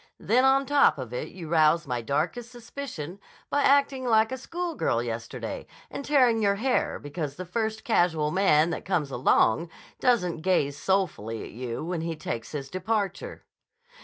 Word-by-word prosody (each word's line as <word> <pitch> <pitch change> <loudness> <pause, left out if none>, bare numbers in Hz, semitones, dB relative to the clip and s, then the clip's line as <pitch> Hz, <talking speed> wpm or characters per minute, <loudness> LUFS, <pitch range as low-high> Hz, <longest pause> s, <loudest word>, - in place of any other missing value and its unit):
Then 240 +5 +2
on 270 +1 +4
top 285 - +4
of 125 -3 -7
it, 125 - -3
you 175 -3 -9
rouse 160 0 +3
my 125 -1 -2
darkest 165 - -2
suspicions 230 - -7 0.3
by 285 - +2
acting 275 -1 +3
like 220 -1 +3
a 260 - -3
school 345 +5 -4
girl 120 - 0
yesterday 115 -1 -5 0.2
and - - -5
tearing 255 -6 +3
your 200 -1 +3
hair 250 +5 0
because 145 -1 -5
the 185 - -6
first 220 +4 -2
casual 165 -8 +2
man 170 -3 +3
that - - -4
comes 155 -7 -1
along 120 +3 +2 0.3
doesn't 180 -10 +1
gaze 155 -6 +1
soulfully 145 - -1
at - - -9
you 120 +4 -5
when 175 -1 -3
he 165 0 -3
takes 120 -6 -5
his 140 -3 -5
departure." 195 +3 -3
180 Hz, 165 wpm, -27 LUFS, 150-235 Hz, 0.3 s, on